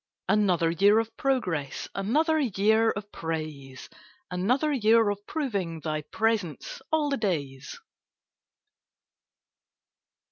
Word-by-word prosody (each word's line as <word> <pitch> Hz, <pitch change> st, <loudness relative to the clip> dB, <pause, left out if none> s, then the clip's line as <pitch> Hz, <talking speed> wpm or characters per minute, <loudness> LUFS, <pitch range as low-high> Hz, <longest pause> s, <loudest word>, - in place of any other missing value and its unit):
Another 180 Hz, -6 st, +2 dB
year 200 Hz, +5 st, +4 dB
of 225 Hz, 0 st, -1 dB
progress, 180 Hz, -, -1 dB
Another 305 Hz, -, +1 dB
year 220 Hz, -2 st, +2 dB
of 205 Hz, -1 st, -5 dB
praise; 155 Hz, -5 st, -6 dB, 0.4 s
Another 250 Hz, +12 st, +1 dB
year 225 Hz, -3 st, +4 dB
of 200 Hz, -, -5 dB
proving 200 Hz, -, -3 dB
Thy 155 Hz, -1 st, -3 dB
presence 205 Hz, -, -2 dB
'all 305 Hz, -2 st, +1 dB
the 275 Hz, -, +1 dB
days.' 145 Hz, -, -3 dB
205 Hz, 100 wpm, -27 LUFS, 165-230 Hz, 0.4 s, year